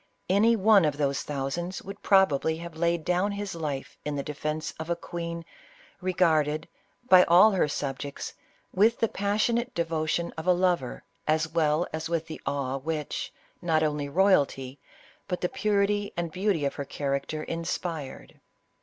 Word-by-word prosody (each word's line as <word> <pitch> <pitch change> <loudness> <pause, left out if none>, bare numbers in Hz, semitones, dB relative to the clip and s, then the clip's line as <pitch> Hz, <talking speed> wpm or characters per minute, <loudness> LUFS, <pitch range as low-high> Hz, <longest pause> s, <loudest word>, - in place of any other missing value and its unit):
Any 220 +4 +5
one 210 -2 +5
of 150 -2 +1
those 140 -2 0
thousands 150 +6 -3
would 195 +1 -9
prob 190 -5 +5
ably 160 +3 0
have 170 -1 -8
laid 170 -1 0
down 185 +3 +1
his 200 -1 -4
life 150 -5 -5
in 150 -1 -3
the 140 - -2
defence 150 +2 -3
of 160 +1 -5
a 170 - +1
queen, 170 -1 -6 0.6
regarded, 160 -4 +2 0.4
by 185 -5 +8
all 180 +6 +7
her 185 -6 +2
subjects, 140 -1 -4 0.4
with 220 +5 +4
the 230 - +3
passionate 215 +4 0
de 170 - +1
votion 165 +1 -1
of 160 - -7
a 180 - +6
lover, 175 -8 0 0.2
as 155 +1 +2
well 160 0 +2
as 160 0 -3
with 165 -1 -1
the 160 -1 -8
awe 135 -1 -1
which, 150 +1 -3 0.3
not 160 -3 +2
only 150 -2 -1
royalty, 140 -6 +2 0.5
but 180 - -2
the 180 - 0
purity 205 -4 +1
and 170 -2 -2
beauty 185 -4 0
of 140 - 0
her 140 - -5
charac 140 0 -2
ter 155 0 -4
inspired. 165 -3 -5
165 Hz, 165 wpm, -27 LUFS, 150-185 Hz, 0.6 s, by